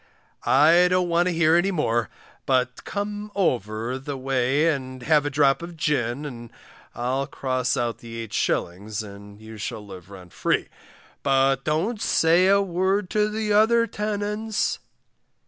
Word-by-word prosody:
I 165 +6 +6
don't 180 -1 +1
want 170 +1 +2
to - - +1
hear 165 -1 +3
any 175 +3 +3
more, 120 -10 0 0.4
but 130 -1 0
come 205 +1 -4
over 120 - -1
the 135 +1 -5
way 135 +3 +1
and 130 -4 -2
have 150 0 +3
a - - 0
drop 140 0 +2
of 170 0 -8
gin, 145 -3 -1
and 120 -5 -8 0.4
I'll 130 +3 -1
cross 130 -2 -1
out 120 -1 -2
the 115 -1 -7
8s. 100 +2 -2
and 100 0 -12
you 110 0 -11
shall 105 0 -5
live 95 -2 -11
rent 90 -3 -13
free; - - 0 0.5
but 135 -1 +2
don't 180 +9 -1
say 170 +3 +3
a 200 +1 +4
word 190 +1 0
to 210 0 +2
the 215 0 -1
other 230 +2 +4
tenants. 210 0 -2
145 Hz, 150 wpm, -24 LUFS, 120-185 Hz, 0.5 s, I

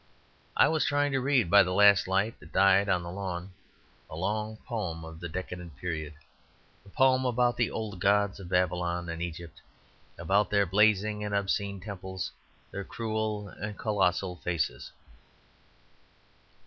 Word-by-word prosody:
I - - +6
was 160 -1 +1
trying 145 0 +1
to 135 - +1
read 130 -5 +2
by 100 0 +9
the 90 -1 0
last 100 -2 +6
light 100 +4 0
that 75 - -15
died 95 +1 +4
on 90 -2 +1
the 85 - -6
lawn 95 -1 -5 0.6
a - - -8
long 105 +5 -2
poem 90 -9 -4
of 80 0 -10
the 85 0 -6
decadent 90 -2 -6
period, 80 -3 -4 0.7
a 100 - -16
poem 130 +4 +3
about 125 -1 +2
the 120 - +1
old 105 -4 -5
gods 100 +1 +2
of 90 -3 -9
Babylon 90 -1 0
and 85 0 -5
Egypt, 85 -1 -7 0.6
about 100 +2 +1
their 100 -1 +3
blazing 105 +2 +2
and 105 -1 -2
obscene 100 0 -1
temples, 95 -1 -6 0.4
their 100 - -5
cruel 110 -2 -3
and 105 +1 -7
colossal 95 -4 0
faces. 85 -3 -3
100 Hz, 150 wpm, -29 LUFS, 90-105 Hz, 0.7 s, by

